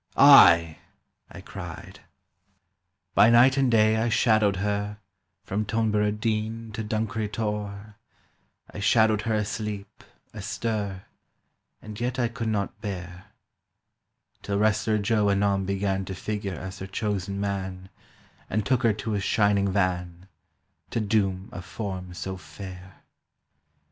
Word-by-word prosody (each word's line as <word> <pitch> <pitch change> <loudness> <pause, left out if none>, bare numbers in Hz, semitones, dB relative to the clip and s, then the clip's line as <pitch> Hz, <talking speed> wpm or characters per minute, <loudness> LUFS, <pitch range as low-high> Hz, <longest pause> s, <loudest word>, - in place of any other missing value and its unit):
"Ay!" 85 - +7 0.5
I - - -10
cried. - - -9 1.1
By 110 - +6
night 120 +3 +6
and 135 -2 +2
day 110 -1 +4
I 115 +2 +1
shadowed 110 -3 +3
her 105 +1 -2 0.5
From 100 +3 -2
Toneborough 105 -1 0
Deane 110 +1 -2
to 110 +1 -4
Dunkery 110 0 -2
Tor, 105 -1 -4 0.8
I - - -7
shadowed 110 0 +3
her 115 -1 -1
asleep, 105 -1 -4 0.3
astir, 105 -5 -3 0.8
And 105 -1 -8
yet 125 +2 -1
I 120 -2 +1
could 115 -1 -5
not 105 -1 -2
bear— 90 -3 -6 1.2
Till 100 0 -2
Wrestler 110 +1 +2
Joe 105 0 +1
anon 100 -1 +1
began 95 0 -1
To 95 - -6
figure 100 -1 -4
as 95 +2 -7
her 95 - -6
chosen 100 -1 -3
man, 95 -2 -4 0.6
And 105 0 -1
took 130 +3 +2
her 115 -4 +3
to 110 +2 -5
his 100 -2 -1
shining 100 -1 +2
van— 90 -2 -1 0.6
To - - -2
doom 100 -3 0
a 95 - -7
form 90 -1 -6
so 95 +1 -5
fair! 90 +3 -11
105 Hz, 130 wpm, -26 LUFS, 95-110 Hz, 1.2 s, Ay